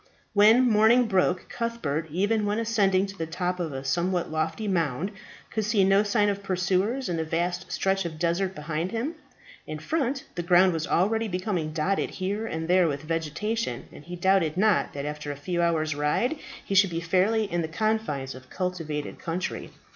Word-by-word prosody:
When 220 Hz, +5 st, +6 dB
morning 225 Hz, +3 st, +5 dB
broke 185 Hz, -3 st, +1 dB
Cuthbert, 200 Hz, -10 st, -3 dB
even 205 Hz, +6 st, +1 dB
when 205 Hz, +1 st, 0 dB
ascending 205 Hz, -4 st, +2 dB
to 195 Hz, 0 st, -9 dB
the 165 Hz, -, -2 dB
top 180 Hz, +2 st, -2 dB
of 165 Hz, -3 st, -2 dB
a 135 Hz, -1 st, -5 dB
somewhat 175 Hz, +5 st, 0 dB
lofty 160 Hz, +7 st, -2 dB
mound, 170 Hz, -1 st, 0 dB, 0.4 s
could 220 Hz, -, -1 dB
see 210 Hz, -1 st, +2 dB
no 195 Hz, +1 st, +5 dB
signs 205 Hz, 0 st, +2 dB
of 200 Hz, 0 st, -5 dB
pursuers 195 Hz, +7 st, 0 dB
in 175 Hz, -, -1 dB
the 160 Hz, -, 0 dB
vast 175 Hz, +3 st, -2 dB
stretch 195 Hz, 0 st, +1 dB
of 165 Hz, -2 st, -5 dB
desert 175 Hz, +3 st, 0 dB
behind 155 Hz, +3 st, -3 dB
him. 235 Hz, +8 st, -2 dB, 0.5 s
In 155 Hz, -, -4 dB
front, 270 Hz, -, -1 dB
the 175 Hz, -, -3 dB
ground 180 Hz, +1 st, +5 dB
was 160 Hz, -1 st, -2 dB
already 220 Hz, +5 st, +1 dB
becoming 180 Hz, -4 st, -2 dB
dotted 170 Hz, +5 st, 0 dB
here 205 Hz, +4 st, -2 dB
and 160 Hz, -3 st, -4 dB
there 180 Hz, 0 st, +4 dB
with 145 Hz, -1 st, -3 dB
vegetation, 165 Hz, -, -2 dB
and -, -, -12 dB
he 175 Hz, +3 st, -7 dB
doubted 180 Hz, -3 st, +2 dB
not 210 Hz, 0 st, +2 dB
that 140 Hz, 0 st, -4 dB
after 150 Hz, 0 st, -4 dB
a -, -, -5 dB
few 170 Hz, +5 st, -2 dB
hours' 160 Hz, -2 st, +1 dB
ride 150 Hz, -, 0 dB, 0.3 s
he -, -, -3 dB
should 195 Hz, 0 st, +5 dB
be 165 Hz, -1 st, -2 dB
fairly 190 Hz, +6 st, +2 dB
in 175 Hz, -4 st, -1 dB
the 160 Hz, -, -2 dB
confines 170 Hz, -8 st, -1 dB
of 130 Hz, 0 st, -13 dB
cultivated 165 Hz, -5 st, -4 dB
country. 175 Hz, +2 st, -4 dB
185 Hz, 185 wpm, -26 LUFS, 160-205 Hz, 0.5 s, When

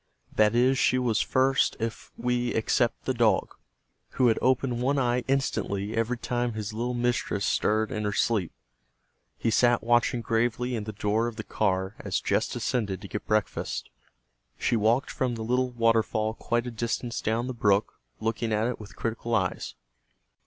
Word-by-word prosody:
That 110 Hz, +1 st, +3 dB
is, 125 Hz, +2 st, +3 dB
she 130 Hz, -, +3 dB
was 120 Hz, -4 st, +1 dB
first 135 Hz, +1 st, +2 dB
if 115 Hz, 0 st, -4 dB
we 120 Hz, 0 st, 0 dB
except 115 Hz, +2 st, +1 dB
the 130 Hz, -, +1 dB
dog, 115 Hz, -3 st, +2 dB, 0.6 s
who 125 Hz, -2 st, +4 dB
had 110 Hz, -, +2 dB
opened 125 Hz, -1 st, +1 dB
one 140 Hz, +3 st, +1 dB
eye 125 Hz, -1 st, +1 dB
instantly 110 Hz, -6 st, -1 dB
every 115 Hz, +2 st, 0 dB
time 120 Hz, 0 st, -1 dB
his 110 Hz, -1 st, -4 dB
little 120 Hz, +3 st, -2 dB
mistress 120 Hz, -4 st, 0 dB
stirred 110 Hz, 0 st, +1 dB
in 105 Hz, -, -2 dB
her 105 Hz, -, 0 dB
sleep. 100 Hz, -4 st, +1 dB, 0.9 s
He 115 Hz, -, 0 dB
sat 120 Hz, +1 st, +3 dB
watching 120 Hz, +1 st, +2 dB
gravely 120 Hz, +2 st, 0 dB
in 110 Hz, -2 st, -3 dB
the 110 Hz, -, -4 dB
door 105 Hz, +2 st, 0 dB
of 120 Hz, -, -5 dB
the 110 Hz, -, -5 dB
car 95 Hz, -2 st, 0 dB
as -, -, -1 dB
Jess -, -, +1 dB
descended 100 Hz, -6 st, -2 dB
to 100 Hz, -, -8 dB
get 105 Hz, -, -6 dB
breakfast. 110 Hz, -1 st, -1 dB, 0.7 s
She -, -, +1 dB
walked 115 Hz, +4 st, +2 dB
from 125 Hz, -2 st, -1 dB
the 110 Hz, -, -5 dB
little 125 Hz, +2 st, +1 dB
waterfall 115 Hz, -2 st, +1 dB
quite 120 Hz, +1 st, -1 dB
a 125 Hz, -, -4 dB
distance 115 Hz, 0 st, -3 dB
down 115 Hz, +2 st, 0 dB
the 130 Hz, -, -3 dB
brook, 105 Hz, -3 st, +1 dB, 0.2 s
looking 115 Hz, 0 st, -1 dB
at 110 Hz, +1 st, +1 dB
it 125 Hz, 0 st, -2 dB
with 105 Hz, -2 st, -11 dB
critical 115 Hz, 0 st, -2 dB
eyes. -, -, -1 dB
115 Hz, 175 wpm, -27 LUFS, 110-125 Hz, 0.9 s, who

